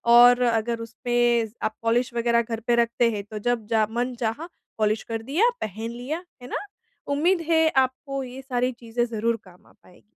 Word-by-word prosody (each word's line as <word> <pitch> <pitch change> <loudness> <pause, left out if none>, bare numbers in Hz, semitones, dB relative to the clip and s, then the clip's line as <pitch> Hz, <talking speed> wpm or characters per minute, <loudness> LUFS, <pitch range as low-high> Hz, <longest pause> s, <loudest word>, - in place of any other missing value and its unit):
और 245 +1 +8
अगर 230 -1 +1
उसमें 240 -1 +1 0.2
आप 215 - -1
पॉलिश 235 +2 +1
वग़ैरह 235 0 +2
घर 225 -1 -4
पे 240 - +4
रखते 235 0 +2
हैं, 205 -2 -4
तो 210 +1 -7
जब 240 0 -1
जा 220 -1 +2
मन 245 +2 -1
चाहा 240 +8 -3 0.3
पॉलिश 215 0 +1
कर 225 -1 -4
दिया, 340 - +3
पहन 220 +3 -4
लिया। 275 +9 -5 0.2
है 245 - -8
ना? - - -3 0.5
उम्मीद 340 +5 +2
है 320 -1 +5
आपको 265 +1 0
ये 255 +1 -8
सारी 255 -1 0
चीज़ें 240 0 -2
ज़रूर 230 0 -1
काम 180 -1 -18
आ - - -21
पाए। 180 - -20
240 Hz, 190 wpm, -25 LUFS, 225-255 Hz, 0.5 s, और